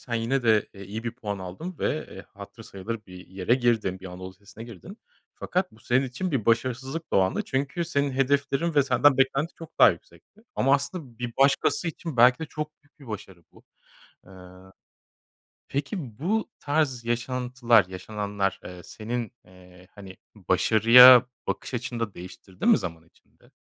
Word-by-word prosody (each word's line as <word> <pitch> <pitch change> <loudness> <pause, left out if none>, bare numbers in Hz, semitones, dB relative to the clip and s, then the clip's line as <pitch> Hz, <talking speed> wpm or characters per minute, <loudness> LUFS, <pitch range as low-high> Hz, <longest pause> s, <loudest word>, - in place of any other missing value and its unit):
sen 120 - -6
yine 120 +3 0
de 110 -3 +3
iyi 100 +4 -8
bir 115 - -2
puan 105 -5 -5
aldım 125 - -7
ve 155 - -4
hatırı 100 +3 -12
sayılır 105 +3 -7
bir 90 0 -12
yere 95 +5 0
girdim, 115 -7 0
bir 95 - -9
anadolu 95 +1 -8
lisesine 105 +4 -13
girdin. 120 - -12 0.4
Fakat 185 +1 -2
bu 110 - -20
senin 130 +3 +1
için 165 +9 -4
bir 125 -7 -2
başarısızlıktı 130 +7 -1
o - - +5
anda. 95 0 0
Çünkü 140 +6 -2
senin 140 -2 -1
hedeflerin 140 +4 0
ve 145 - +5
senden 135 +1 +3
beklenti 135 +5 +1
çok 165 -1 -13
daha - - +8
yüksekti. 215 - -13
Ama 135 +2 +3
aslında 140 -4 -4
bir 120 -1 -4
başkası 140 +5 +2
için 160 -3 -7
belki 125 +1 +6
de 160 - -4
çok 150 0 -5
büyük 145 +1 -34
bir 135 - -14
başarı 95 -5 -9
bu. - - -19 0.6
Iıı, 95 0 -15 1.0
peki, 140 - -4
bu 215 - -1
tarz 145 -5 -1
yaşantılar, 120 -2 +1
yaşananlar, 100 +1 -3
eee, 90 -1 -9
senin, 115 +1 -5
eee, 90 0 -18
hani, 95 -2 -11 0.2
başarıya 125 +3 +7 0.2
bakış - - -4
açını 120 0 -4
da 115 -4 -3
değiştirdi 90 +1 -9
mi - - +6
zaman 85 -2 -7
içinde? - - -28
120 Hz, 160 wpm, -26 LUFS, 100-140 Hz, 1.0 s, daha